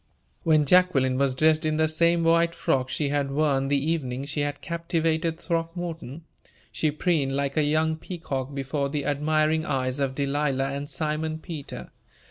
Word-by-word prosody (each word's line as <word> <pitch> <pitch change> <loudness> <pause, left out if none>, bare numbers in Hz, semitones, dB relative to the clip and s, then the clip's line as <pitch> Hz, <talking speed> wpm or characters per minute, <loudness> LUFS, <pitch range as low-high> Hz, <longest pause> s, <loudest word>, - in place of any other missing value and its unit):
When 155 -3 +3
Jacqueline 140 -6 +3
was 135 -2 +2
dressed 155 +3 +3
in 155 0 0
the 160 0 +3
same 170 +2 +2
white 170 +1 +3
frock 130 -5 0
she 140 +2 -1
had 140 -1 0
worn 140 -1 +1
the 140 +1 +2
evening 140 -3 -2
she 150 +1 -4
had 145 0 -1
captivated 165 -1 -1
Throckmorton, 165 -3 -4 0.5
she 155 - 0
preened 150 -3 0
like 140 0 -1
a 155 - +3
young 155 +2 +1
peacock 145 -6 -5
before 140 +1 -2
the 145 -1 -3
admiring 155 +2 +1
eyes 130 -2 -1
of 135 -1 -1
Delilah 140 -1 0
and 140 +1 -5
Simon 155 0 -2
Peter. 160 -3 -8
150 Hz, 160 wpm, -26 LUFS, 140-160 Hz, 0.5 s, When